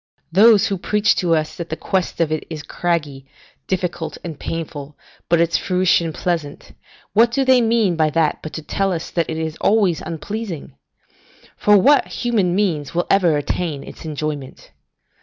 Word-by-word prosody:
Those 210 +3 +6
who 195 -2 -2
preach 210 +2 +2
to 170 -2 +2
us 155 -1 -2
that 170 -1 -6
the 160 - -2
quest 185 +2 -2
of 165 -2 +1
it 155 - -1
is 155 -3 -6
craggy, 150 -7 -2 0.4
difficult, 175 -4 -3
and 160 -4 -7
painful, 150 -3 -6 0.3
but 170 0 +4
its 170 0 +2
fruition 180 -3 +1
pleasant, 160 -3 -3 0.4
what 230 +2 +5
do 270 +3 0
they 260 -1 +5
mean 225 -5 +2
by 155 -1 +2
that 160 0 +1
but 155 - -7
to 160 - -6
tell 195 +4 -1
us 170 -2 -4
that 170 -2 -1
it 160 - -3
is 160 0 -4
always 200 -6 +2
unpleasing? 175 +1 -6 0.8
For 210 0 +4
what 280 +9 +4
human 210 -8 0
means 170 -8 -1
will 175 - +1
ever 175 -6 +4
attain 145 0 -3
its - - -11
enjoyment? 150 -3 -5
170 Hz, 170 wpm, -20 LUFS, 155-195 Hz, 0.8 s, Those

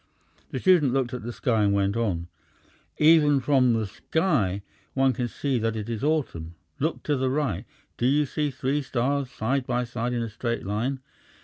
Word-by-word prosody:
The - - -4
student 170 -9 +4
looked 130 -3 0
at 125 - -4
the 120 +3 -5
sky 115 -2 0
and 100 -1 +3
went 100 0 +1
on: 95 -8 -1 0.7
"Even 150 -2 +5
from 130 -2 +3
the 110 -1 0
sky 105 - 0 0.3
one 135 -1 +3
can 125 -1 -2
see 135 +1 -1
that 115 0 -1
it 110 +1 -4
is 115 +1 -4
autumn. 125 - -1 0.2
Look 160 +4 -1
to 150 - +1
the 130 -1 0
right. 135 - -1 0.3
Do 120 - +1
you 145 +3 +3
see 150 +2 -1
three 135 +2 -1
stars 135 +1 -1
side 125 +2 -1
by 125 0 0
side 120 0 -3
in 120 -1 -1
a 115 - -4
straight 115 0 -3
line? 120 +7 -2
125 Hz, 190 wpm, -26 LUFS, 115-140 Hz, 0.7 s, Even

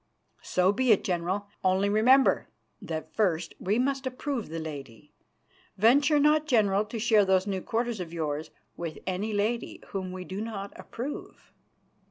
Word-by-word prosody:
"So 185 +1 +2
be 255 +3 +2
it, 210 - +4
General, 185 +3 -1 0.2
only 190 +1 +3
remember 245 +6 +4 0.3
that 160 -1 -5
first 175 -6 0
we 200 +4 0
must 270 +1 0
approve 255 - -3
the 165 - -5
lady. 140 -7 -8 0.6
Venture 280 +8 +5
not, 300 +1 +3
General, 210 -5 +3
to 225 - -6
share 220 -2 +4
those 190 -1 +3
new 195 -2 -2
quarters 230 +1 -2
of 170 -3 -5
yours 155 -2 -3 0.3
with 165 -2 -5
any 190 +4 -2
lady 215 +3 -1
whom 190 -2 -4
we 185 0 -6
do 190 +3 -5
not 205 -3 -5
approve." 265 +5 -7
200 Hz, 155 wpm, -28 LUFS, 180-235 Hz, 0.6 s, Venture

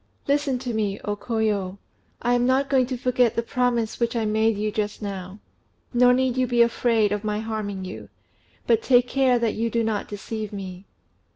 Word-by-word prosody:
"Listen 280 -2 +1
to 245 -1 -4
me, 210 -2 -1
O 205 - -1
Koyo! 205 -4 -1 0.5
I 245 0 +2
am 245 0 +2
not 270 +2 +2
going 260 -2 +3
to 255 -1 -3
forget 250 -2 +2
the 230 - 0
promise 240 -2 0
which 235 0 0
I 225 -2 0
made 220 0 +2
you 210 +1 -1
just 210 -1 -2
now; 195 -2 -6 0.6
nor 245 +1 +5
need 255 0 +1
you 255 -1 +2
be 240 0 +4
afraid 230 -2 +2
of 205 0 -2
my 210 0 -1
harming 215 -3 -4
you; 185 - -8 0.6
but 230 -1 +3
take 245 0 +4
care 260 -1 +3
that 230 -2 0
you 230 +1 -1
do 230 0 0
not 220 -2 -1
deceive 215 +1 -5
me." 190 -2 -7
225 Hz, 195 wpm, -24 LUFS, 210-245 Hz, 0.6 s, nor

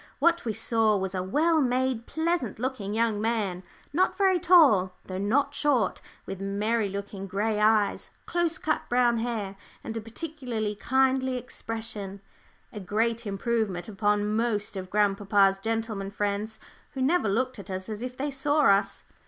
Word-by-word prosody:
What 340 -2 +2
we 225 - -1
saw 220 0 +2
was 190 0 -3
a 185 - -1
well 310 - +2
made, 255 -2 0
pleasant 320 - -1
looking 225 -4 -3
young 225 -2 +1
man, 215 -5 -1 0.3
not 365 +5 +2
very 380 -2 +3
tall, 285 - +5
though 185 0 -5
not 270 +8 +1
short, 285 -6 +1 0.2
with 195 0 -6
merry 205 +2 0
looking 200 0 -6
grey 210 +3 -1
eyes, 215 -1 +2 0.2
close 345 -2 0
cut 310 - 0
brown 240 -1 +3
hair, 225 -4 -3 0.3
and 225 - -5
a 225 - -3
particularly 230 -3 -4
kindly 260 +3 +1
expression, 225 -5 -6 0.5
a 210 - -6
great 225 +4 -1
improvement 200 -3 -1
upon 210 0 0
most 215 -3 -1
of 185 -1 -5
grandpapa's 200 -1 +3
gentlemen 220 -2 -2
friends, 205 +2 -2 0.3
who 265 - -4
never 280 - +2
looked 255 +3 -1
at 200 - -9
us 185 0 -4
as 215 -1 -5
if 250 0 -5
they 285 +2 -2
saw 290 +2 +1
us. 200 -5 +3
220 Hz, 155 wpm, -27 LUFS, 200-260 Hz, 0.5 s, tall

